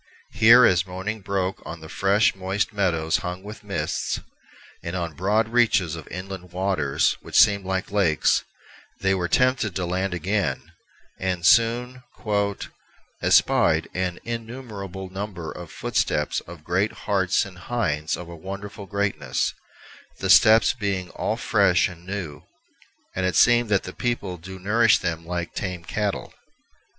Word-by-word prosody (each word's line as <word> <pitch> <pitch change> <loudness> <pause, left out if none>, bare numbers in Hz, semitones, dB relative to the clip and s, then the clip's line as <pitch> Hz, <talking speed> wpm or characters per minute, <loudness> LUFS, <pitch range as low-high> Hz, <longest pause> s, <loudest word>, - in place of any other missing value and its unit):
Here, 120 +2 +7
as 95 -2 +3
morning 95 +4 -5
broke 95 0 -2
on 85 - -7
the 80 - -9
fresh, 100 +6 +2
moist 95 +4 -2
meadows 85 -6 +1
hung 90 +1 -5
with 105 +2 -10
mists, 80 -7 -2 0.6
and 85 +2 -5
on 85 -3 -3
broad 105 +7 +1
reaches 105 -9 +2
of 80 -3 -9
inland 90 0 -7
waters 90 -6 0
which - - -3
seemed 100 -3 +5
like 95 0 -2
lakes, 95 -7 +2 0.6
they 95 0 +2
were 90 -2 -1
tempted 125 -3 +2
to 90 - -1
land 90 +1 -1
again, 100 +3 -2 0.5
and 90 -2 -2
soon 120 +6 +3 1.2
"espied - - +3
an 90 -1 -2
innumerable 110 -6 -6
number 95 -4 -5
of 85 -2 -9
footesteps - - -1
of 85 -2 -11
great 95 +6 0
Hartes 95 -1 +2
and 95 -2 -12
Hindes 85 -10 -1
of 90 - -8
a 85 - -9
wonderfull 100 +3 -8
greatnesse, 100 -11 -1 0.6
the - - +1
steppes 110 +1 +6
being 100 -6 -3
all - - -2
fresh 90 -1 +3
and 90 0 -12
new, 90 -7 -5 0.7
and 95 - -1
it 95 - -1
seemeth 120 -1 +5
that 100 -2 +2
the 90 - -7
people 105 -7 -2
doe 95 +3 -9
nourish 110 +5 +4
them 85 -1 -4
like 85 -1 -4
tame 90 -3 -4
Cattell." 105 +3 -3
95 Hz, 145 wpm, -24 LUFS, 90-105 Hz, 1.2 s, Here